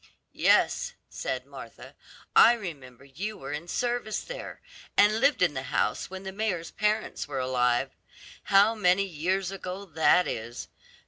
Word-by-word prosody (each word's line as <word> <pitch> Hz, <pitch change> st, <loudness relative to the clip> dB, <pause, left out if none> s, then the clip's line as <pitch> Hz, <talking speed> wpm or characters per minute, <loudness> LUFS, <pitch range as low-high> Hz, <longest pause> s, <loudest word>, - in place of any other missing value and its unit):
"Yes," 485 Hz, 0 st, +2 dB, 0.2 s
said -, -, -4 dB
Martha; -, -, -11 dB, 0.4 s
"I 235 Hz, -, +8 dB
remember 140 Hz, -, -8 dB
you 195 Hz, +11 st, -6 dB
were 135 Hz, +1 st, -7 dB
in 150 Hz, +4 st, -5 dB
service 240 Hz, +1 st, -2 dB
there, -, -, -8 dB, 0.4 s
and 210 Hz, +2 st, +5 dB
lived 270 Hz, -6 st, +3 dB
in 170 Hz, -5 st, +3 dB
the 130 Hz, -, -3 dB
house -, -, 0 dB
when 190 Hz, +1 st, -8 dB
the 190 Hz, -, -5 dB
mayor's 190 Hz, -5 st, -2 dB
parents 210 Hz, -4 st, -1 dB
were 140 Hz, -2 st, -5 dB
alive; 125 Hz, -2 st, +1 dB, 0.5 s
how 200 Hz, +3 st, +5 dB
many 195 Hz, -3 st, +3 dB
years 185 Hz, +2 st, -1 dB
ago 195 Hz, 0 st, -6 dB
that 165 Hz, +1 st, +3 dB
is. 115 Hz, +2 st, -5 dB
185 Hz, 145 wpm, -27 LUFS, 145-210 Hz, 0.5 s, I